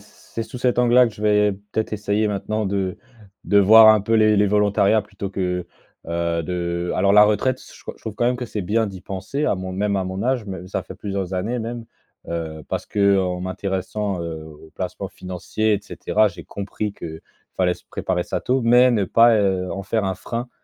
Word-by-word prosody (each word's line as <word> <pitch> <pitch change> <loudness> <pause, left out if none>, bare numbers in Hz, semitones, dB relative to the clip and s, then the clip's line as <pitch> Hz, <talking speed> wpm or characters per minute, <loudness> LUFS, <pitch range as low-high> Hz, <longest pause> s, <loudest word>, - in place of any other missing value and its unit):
c - - -19 0.3
c'est 115 - -1
sous 115 +3 -8
cet 125 -1 +1
angle-là 125 +1 +5
que 115 - -6
je 105 - -10
vais 105 -1 +3 0.2
peut-être 110 -1 -1
essayer 105 +1 0
maintenant 105 +1 -2
de 95 -2 -2 0.5
de 100 - +4
voir 110 +3 +8
un 110 -2 +6
peu 115 +3 -2
les 110 -1 +4
les 105 0 +4
volontariats 105 +1 +3
plutôt 100 -2 -7
que, 90 -2 -2 0.4
heu, 85 0 -1
de 85 0 -2
alors 100 +1 +3
la 105 0 +9
retraite, 115 +5 +1
s - - -15
ch - - -17
je - - -24
trouve 110 - -5
quand 120 - 0
même 125 0 +1
que 125 - -4
c'est 110 -2 -4
bien 110 +4 +1
d'y 95 -2 -8
penser 100 +12 -3
à - - +2
mon 95 0 -5
même 100 +1 0
à 95 - -1
mon 95 +2 -4
âge, 125 -2 0
mais 95 -3 -7
ça - - -3
fait - - -10
plusieurs 100 -2 -4
années 110 +7 -2
même, 115 0 -5 0.4
heu, 80 -2 -4
parce - - -3
qu'en 95 -3 +1
m'intéressant, 95 +1 -3
heu, 80 -2 -5
aux 80 0 -14
placements 95 +1 -5
financiers 95 +4 -2
et 100 - +1
cetera, 110 0 +1
j'ai 90 - -11
compris 100 +1 -5
que 80 -4 -8 0.3
fallait 90 -1 +2
se - - -12
préparer 90 -1 -2
ça - - -3
tôt. 130 +1 +1
Mais 125 +2 +6
ne 110 -5 +2
pas, 115 +4 +5
heu, 95 -3 0
en 100 - -4
faire 105 +2 -1
un 95 -1 -1
frein 120 +4 -5
100 Hz, 220 wpm, -22 LUFS, 95-110 Hz, 0.5 s, la